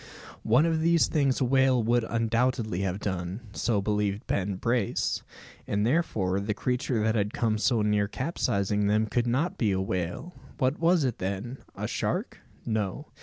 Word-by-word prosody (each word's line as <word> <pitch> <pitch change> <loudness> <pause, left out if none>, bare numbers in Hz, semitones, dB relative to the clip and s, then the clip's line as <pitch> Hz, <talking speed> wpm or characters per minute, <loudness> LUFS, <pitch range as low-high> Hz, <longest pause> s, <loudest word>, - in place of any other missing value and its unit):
One 125 +8 +4
of 165 -1 +1
these 170 0 +4
things 140 -5 +1
a - - +3
whale 130 -1 +3
would 120 +1 +2
undoubtedly 115 -3 0
have 95 -1 -1
done. 95 +1 -3
So 105 -2 0
believed 105 0 -1
Ben 100 0 -1
Brace; 115 +1 0 0.5
and 105 +1 0
therefore 110 - +1
the 105 +1 -2
creature 125 -2 -1
that 110 0 +2
had 105 -1 -1
come 110 -2 0
so 115 -1 +2
near 105 -1 +2
capsizing 105 - -1
them 105 +2 +2
could 120 +2 0
not 140 +9 0
be 110 -5 +2
a 95 - 0
whale. 95 - -3 0.2
What 130 +1 0
was 170 -1 +3
it, 125 -4 -1
then? 100 +7 -4 0.2
A - - -3
shark? - - -2 0.3
No. 110 +5 -2
110 Hz, 170 wpm, -27 LUFS, 100-130 Hz, 0.5 s, One